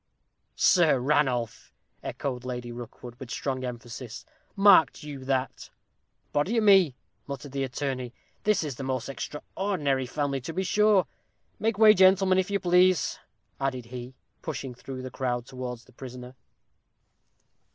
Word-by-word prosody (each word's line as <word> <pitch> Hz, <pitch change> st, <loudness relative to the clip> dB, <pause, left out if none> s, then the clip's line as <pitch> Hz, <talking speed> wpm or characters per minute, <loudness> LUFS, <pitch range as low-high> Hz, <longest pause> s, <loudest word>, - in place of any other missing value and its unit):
"Sir 165 Hz, -7 st, +4 dB
Ranulph!" 125 Hz, -4 st, 0 dB, 0.3 s
echoed 125 Hz, -3 st, -4 dB
Lady 125 Hz, -1 st, -5 dB
Rookwood, 120 Hz, 0 st, -9 dB
with 130 Hz, -3 st, -8 dB
strong 130 Hz, 0 st, -3 dB
emphasis; 120 Hz, -1 st, -7 dB, 0.3 s
"marked 195 Hz, -8 st, +5 dB
you 145 Hz, -3 st, -7 dB
that?" 135 Hz, -1 st, -2 dB, 0.6 s
"Body 165 Hz, +11 st, +1 dB
o' -, -, +4 dB
me," 190 Hz, -9 st, +6 dB, 0.3 s
muttered 140 Hz, 0 st, -6 dB
the 135 Hz, 0 st, -2 dB
attorney, 130 Hz, -1 st, -3 dB, 0.3 s
"this 210 Hz, -5 st, +2 dB
is 140 Hz, -5 st, -5 dB
the 135 Hz, -, -5 dB
most 130 Hz, -3 st, -2 dB
extraordinary 150 Hz, -2 st, -2 dB
family, 140 Hz, 0 st, -2 dB
to 165 Hz, +6 st, -6 dB
be 190 Hz, -, -1 dB
sure. 210 Hz, 0 st, +4 dB, 0.5 s
Make 220 Hz, -1 st, 0 dB
way, 215 Hz, -1 st, +8 dB
gentlemen, 190 Hz, -1 st, +5 dB
if 190 Hz, -, -1 dB
you 200 Hz, 0 st, 0 dB
please," 180 Hz, 0 st, +3 dB, 0.4 s
added 130 Hz, -3 st, -2 dB
he, 125 Hz, +1 st, -7 dB, 0.3 s
pushing 135 Hz, -4 st, -5 dB
through 130 Hz, +1 st, -8 dB
the 130 Hz, -, -6 dB
crowd, 120 Hz, -1 st, -2 dB
towards 125 Hz, -2 st, -7 dB
the -, -, -20 dB
prisoner. 125 Hz, -1 st, -9 dB
135 Hz, 140 wpm, -27 LUFS, 125-180 Hz, 0.6 s, way